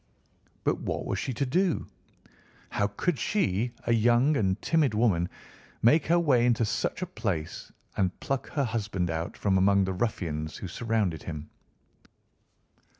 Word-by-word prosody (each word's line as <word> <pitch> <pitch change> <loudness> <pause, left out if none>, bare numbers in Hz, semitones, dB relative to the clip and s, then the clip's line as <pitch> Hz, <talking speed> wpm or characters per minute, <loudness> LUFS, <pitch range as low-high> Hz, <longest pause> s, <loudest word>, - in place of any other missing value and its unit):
But - - +1
what - - -3
was - - -2
she - - -2
to 135 +5 -1
do? 170 +5 +1 0.8
How 100 - +1
could 135 - -1
she, 115 - 0
a 120 - +3
young 120 +6 +4
and 95 -4 +1
timid 150 -8 +2
woman, 95 -6 +2 0.5
make 145 +7 +5
her 170 +2 +4
way 135 -8 +3
into 115 -1 +3
such 110 - -1
a - - 0
place 95 - -4 0.2
and 95 -1 0
pluck 135 -1 -2
her 145 - 0
husband 105 -6 -1
out 80 +1 -3
from 95 -2 +2
among 100 +1 +4
the 95 - -2
ruffians 85 -7 -2
who 95 - -6
surrounded 105 -5 -1
him? 75 -2 -7
110 Hz, 150 wpm, -28 LUFS, 95-130 Hz, 0.8 s, make